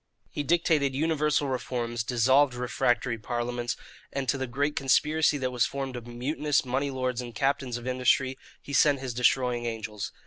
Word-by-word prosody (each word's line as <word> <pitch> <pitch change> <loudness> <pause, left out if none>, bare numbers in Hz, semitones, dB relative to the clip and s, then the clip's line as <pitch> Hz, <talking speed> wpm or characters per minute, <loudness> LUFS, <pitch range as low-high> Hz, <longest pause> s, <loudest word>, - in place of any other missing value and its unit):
He - - -3
dictated 150 -3 +2
universal 150 -1 +1
reforms, 120 -3 -2
dissolved 130 +3 +3
refractory 120 -1 0
parliaments, 120 +1 -3 0.3
and 135 -1 -3
to - - +3
the 130 - -2
great 145 +4 -1
conspiracy 150 +4 +3
that 130 -2 -2
was 125 -2 +2
formed 135 -2 -4
of 120 -1 -7
mutinous 140 +5 0
money 135 +3 -1
lords 130 -2 -2
and 120 -2 -8
captains 135 -1 0
of 120 - -9
industry 130 +1 +2 0.3
he 140 - -8
sent 145 0 +4
his 130 -2 -4
destroying 125 0 +1
angels. 110 -2 -4
130 Hz, 165 wpm, -27 LUFS, 120-140 Hz, 0.3 s, sent